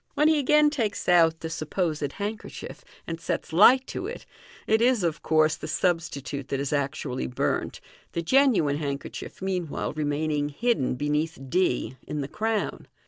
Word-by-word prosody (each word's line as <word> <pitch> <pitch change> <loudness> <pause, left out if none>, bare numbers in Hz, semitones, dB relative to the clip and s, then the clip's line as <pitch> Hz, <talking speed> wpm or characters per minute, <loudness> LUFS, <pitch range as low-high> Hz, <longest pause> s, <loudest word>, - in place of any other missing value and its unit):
When 300 - +4
he 315 -1 +4
again 300 +2 +4
takes 230 -8 -2
out 165 -2 +4
the 160 - -4
(supposed) 155 -2 -2
handkerchief, 210 +2 -6 0.2
and 165 0 -5
sets 165 - -3
light 250 +9 +7
to 365 - -4
it, 470 - -7 0.4
it 220 +1 +2
is, 240 -4 +3
of 165 -2 -1
course, 155 0 +3
the 155 - -7
substitute 155 -5 -1
that 135 - -2
is 140 +1 -2
actually 140 -2 -2
burnt, 125 - -2 0.3
the 170 - -2
genuine 220 - +3
handkerchief 140 +4 -5
meanwhile 180 -5 -2
remaining 150 0 -1
hidden 150 - 0
beneath 150 +4 -1
d 130 -7 0
in 150 -1 -3
the 135 - -3
crown. 220 +5 -2
160 Hz, 155 wpm, -26 LUFS, 145-215 Hz, 0.4 s, light